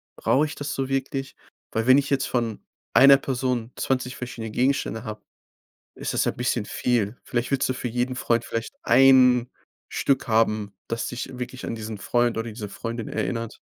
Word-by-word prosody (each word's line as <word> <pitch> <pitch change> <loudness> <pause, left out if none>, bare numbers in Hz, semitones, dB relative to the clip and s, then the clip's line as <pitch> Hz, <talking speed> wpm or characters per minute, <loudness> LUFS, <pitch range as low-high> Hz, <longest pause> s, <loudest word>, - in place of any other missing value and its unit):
brauche 145 +3 +2
ich 150 - -6
das 145 +1 -4
so 135 -1 -2
wirklich?“ 135 0 -2 0.4
Weil 115 +2 -1
wenn 130 +2 +8
ich 140 0 +1
jetzt 140 -1 +1
von 115 -4 -2 0.3
einer 135 0 +8
Person 125 -3 -2
20 125 -1 -1
verschiedene 115 -3 -6
Gegenstände 125 -2 0
habe, 110 -2 -7 0.7
ist - - -4
das - - +1
ja - - +2
bisschen 120 -2 -1
viel. 120 -2 0
Vielleicht 120 +1 -2
willst 135 - +2
du 130 - 0
für 125 - -4
jeden 125 +2 -1
Freund 120 -1 0
vielleicht 115 0 -4
1 125 -1 +6 0.4
Stück 140 0 0
haben, 110 -2 +1
das 115 0 -2
dich 125 +1 -6
wirklich 125 +1 -6
an - - -3
diesen 110 -1 -6
Freund 120 +4 +1
oder 115 +1 -2
diese 105 -1 -6
Freundin 115 +2 -5
erinnert. 110 +2 -3
125 Hz, 180 wpm, -25 LUFS, 115-130 Hz, 0.7 s, wenn